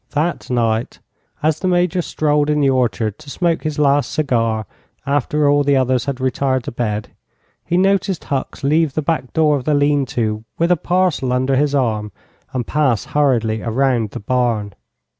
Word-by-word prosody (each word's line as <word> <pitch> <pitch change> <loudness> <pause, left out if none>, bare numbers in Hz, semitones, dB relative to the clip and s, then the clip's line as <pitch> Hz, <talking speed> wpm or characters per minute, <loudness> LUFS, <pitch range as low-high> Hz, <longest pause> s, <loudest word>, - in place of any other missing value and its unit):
That 160 +4 -1
night, 115 -2 0 0.5
as 155 0 +1
the 185 - -1
Major 180 0 +2
strolled 150 -2 0
in 150 0 +2
the 140 -2 +3
orchard 110 -4 0
to 145 - -12
smoke 170 +2 0
his 155 -2 -3
last 145 -1 +2
cigar 115 -7 0 0.4
after 145 +1 +1
all 145 0 +4
the 140 0 +2
others 130 -2 +1
had 140 -2 -3
retired 130 0 0
to - - -5
bed, 110 -3 -3 0.5
he 175 - 0
noticed 190 -1 +1
Hucks 140 +1 -4
leave 150 0 +2
the 155 - -1
back 150 -4 -1
door 155 -2 +3
of 130 - -7
the 150 - +2
lean 145 -1 +2
to 110 -3 -2
with 170 +1 +1
a - - +6
parcel 175 -6 0
under 130 +2 +1
his 145 +1 +1
arm 110 -5 0 0.4
and 125 -3 -3
pass 130 -7 +1
hurriedly 115 -7 +1
around 120 -1 0
the - - -7
barn. 115 -3 -1
140 Hz, 180 wpm, -19 LUFS, 120-150 Hz, 0.5 s, a